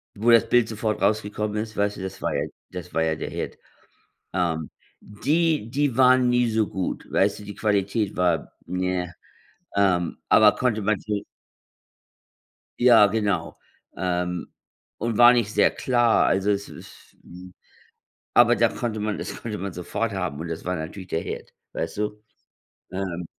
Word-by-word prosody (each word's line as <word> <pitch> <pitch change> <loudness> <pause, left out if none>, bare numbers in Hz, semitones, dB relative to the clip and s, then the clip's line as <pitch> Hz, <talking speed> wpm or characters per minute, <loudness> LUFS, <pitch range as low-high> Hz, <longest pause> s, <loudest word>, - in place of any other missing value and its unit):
Wo 110 +3 +1
das 115 - +5
Bild 120 -2 +4
sofort 110 -1 -2
rausgekommen 105 +1 0
ist? 110 0 -4
Weißt 100 0 +1
du, - - -7
das 95 0 -7
war - - -1
ja - - 0 0.3
das 90 -1 -8
war 80 - +1
ja 80 -1 +1
der 80 - -5
Hit. - - -5 0.8
Ähm, 85 -4 -1 0.3
die 150 +3 0
die 140 -2 0
waren 130 -1 +5
nie 125 -1 +2
so 110 -1 +1
gut. 95 -1 -4
Weißt 100 +2 +1
du, 105 - -10
die 105 0 -8
Qualität 105 0 0
war 90 -3 0
ne, 90 -1 -2 0.6
ähm, 90 -4 +1
aber 105 -1 +7
konnte 115 -4 0
man 105 -1 +1
sich 105 -1 -3 1.6
Ja, 120 -4 +7
genau, 100 -5 -1 0.4
ähm, 90 0 -2 0.5
und 115 -1 -2
war 120 +1 +8
nicht 110 -3 0
sehr - - +4
klar. 120 -3 +2
Also, 95 +2 +2
es 100 0 -2
ist, - - -14
hm 90 +1 -13 0.8
aber - - +6
da - - +4
konnte 115 -3 -4
man 105 0 -2
das - - -6
konnte 110 -3 -4
man 95 -1 -4
sofort 100 +6 -3
haben. 90 -6 -3
Und 85 - -5
das 80 -1 -6
war 90 +1 -1
natürlich 90 +4 -6
der 80 - -1
Hit, - - -7 0.2
weißt 80 - -4
du? 105 0 -3 0.7
Ähm 90 -2 -4
105 Hz, 165 wpm, -24 LUFS, 90-110 Hz, 1.6 s, war